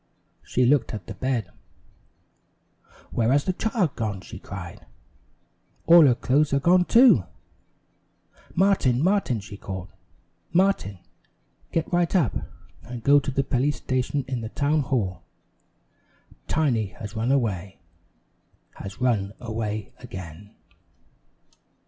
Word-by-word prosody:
She 125 - 0
looked 130 -3 +2
at 105 - -8
the - - -7
bed. 125 -7 -2 1.6
"Where 115 +1 +1
has 140 +1 +3
the 185 - -1
child 200 - -1
gone?" 105 -5 -3
she - - -10
cried. - - -9 1.0
"All 165 -2 +8
her 125 - +4
clothes 140 +4 +1
are - - +3
gone, 180 +4 +4
too!" 230 - +6 1.3
"Martin! 165 -9 +3
Martin!" 185 - +1
she 100 0 -10
called. 95 -2 -7 0.6
"Martin, 180 - +1 0.7
get 165 +1 -2
right 175 +1 +2
up, 160 - +2 0.5
and 120 -1 -8
go 145 +3 +6
to 140 - -4
the 135 +1 0
police 135 +2 0
station 130 +1 -1
in 130 -3 -3
the 110 - -5
town 145 +5 +1
hall. 110 - -2 1.3
Tiny 125 -9 +1
has 105 0 -7
run 115 +4 0
away 100 -8 -1 1.0
has 95 0 -8
run 105 -6 0
away 110 -3 -4
again!" 95 -3 -10
125 Hz, 120 wpm, -25 LUFS, 105-150 Hz, 1.6 s, All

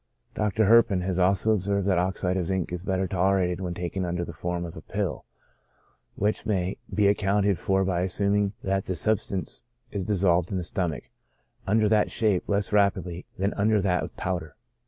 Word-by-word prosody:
Dr. 105 0 +1
Herpin 110 -3 +5
has 90 0 -1
also 95 +4 +3
observed 100 -1 0
that 95 -3 +2
oxide 90 0 -1
of 90 -3 -1
zinc 95 -2 -2
is 90 0 -4
better 95 -1 0
tolerated 95 0 +1
when 90 -2 -3
taken 90 +2 -3
under 85 0 -2
the 85 - -8
form 85 +2 -3
of 85 - -8
a - - -8
pill, - - -3 0.9
which 105 +2 0
may 95 -3 -1
be 105 - +2
accounted 100 -2 +2
for 95 0 +1
by 90 -2 0
assuming 100 +2 +1
that 95 0 0
the 95 - -2
substance 95 -4 -1 0.3
is 100 -2 -3
dissolved 90 -3 +2
in 95 - -1
the 90 - -2
stomach, 85 -3 -2 0.6
under 110 +2 +3
that 105 0 +3
shape, 105 -5 +1
less 100 0 0
rapidly 95 -4 +1
than 100 +2 0
under 105 +1 +2
that 95 -2 +1
of - - -6
powder. 85 -4 -3
95 Hz, 180 wpm, -26 LUFS, 90-100 Hz, 0.9 s, Herpin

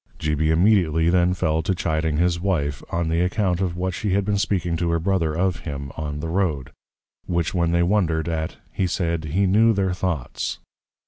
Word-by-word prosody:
G. 75 -1 -1
B. 80 +1 +1
immediately 85 -2 +3
then 90 0 +3
fell 80 -2 0
to 95 +4 -1
Chiding 80 -2 -1
his 85 0 +1
Wife, 75 -8 -1
on 85 -1 -1
the 80 +1 +1
account 90 -1 0
of 90 -2 -1
what 90 +1 -1
she 100 +1 -2
had 100 0 +1
been 100 -1 0
speaking 90 -4 0
to 85 0 -1
her 85 - +2
Brother, 85 -3 0
of 90 +1 +1
him, 70 -3 -6
on 75 -1 -4
the 80 - -3
Road: 80 -7 -1 0.6
which 85 -2 -1
when 85 -2 +1
they 85 0 +3
wondred 85 -4 +1
at, 80 -1 -3 0.2
he 95 - 0
said, 85 -2 -1
_He 95 +6 +2
knew 110 +4 +4
their 95 -3 0
thoughts. 90 -8 -3
85 Hz, 200 wpm, -23 LUFS, 80-95 Hz, 0.6 s, knew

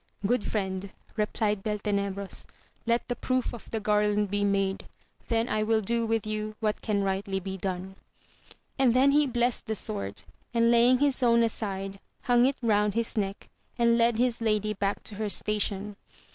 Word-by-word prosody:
Good 240 +1 +2
friend, 190 -2 -2 0.3
replied 210 -2 0
BQltenebros, 200 -2 -2 0.4
let 235 0 +1
the 245 - -2
proof 255 +1 -1
of 240 - -10
the 225 - -2
garland 210 -1 +1
be 205 0 +1
made, 195 -1 0 0.4
th^ 230 0 +1
I 215 - 0
will 220 0 +2
do 230 +2 0
with 225 -1 0
you 215 0 -3
what 215 -2 -1
can 205 -2 0
rightly 195 0 -1
be 190 0 -5
done. 190 0 -4 0.8
And 250 -3 +4
then 270 +2 +5
he 295 0 +4
blessed 245 -1 0
the 220 - -1
sword, 100 - -4 0.3
and 230 0 +4
laying 240 +2 +5
his 275 -1 +1
own 235 -1 +4
aside, 195 -3 -3 0.2
hung 245 0 +4
it 275 - -1
round 210 -2 +2
his 230 0 -1
neck, 200 -2 -2 0.3
and 235 -1 +4
led 235 -1 +3
his 245 -1 +1
lady 215 -1 +1
back 200 0 -2
to 210 - -6
her 215 -1 -2
station. 205 -1 0
215 Hz, 170 wpm, -28 LUFS, 200-235 Hz, 0.8 s, then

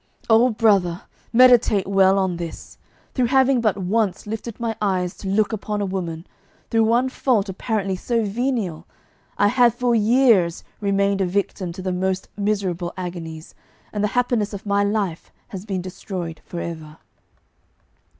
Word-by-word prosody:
Oh, 230 +3 +6
brother, 200 -6 +2 0.3
meditate 240 -5 +5
well 195 0 +4
on 190 -3 0
this! 170 -1 -8 0.3
Through 250 -2 +1
having 265 0 +3
but 215 -3 +1
once 200 +1 -1
lifted 220 +1 -6
my 230 -1 -2
eyes 185 -3 0
to 195 - -7
look 215 +3 +1
upon 210 0 -3
a 205 - 0
woman, 175 -3 -4 0.5
through 225 -1 +3
one 240 +3 +2
fault 240 -6 0
apparently 195 0 -2
so 230 +5 -1
venial, 205 -7 -2 0.5
I 205 - +4
have 245 -1 +4
for 245 -1 +1
years 220 -6 +3 0.2
remained 200 -1 +1
a - - +2
victim 185 -1 -2
to 185 +1 -8
the 185 - -1
most 185 +1 -2
miserable 195 -4 -1
agonies, 170 -3 -7 0.4
and 205 -1 -1
the - - +3
happiness 235 -4 +1
of 200 +1 -7
my 200 0 +2
life 200 -5 -2 0.2
has 195 +1 -8
been 190 -3 -2
destroyed 180 -3 -6
for 175 - -6
ever. 160 -2 -7
200 Hz, 155 wpm, -22 LUFS, 185-225 Hz, 0.5 s, Oh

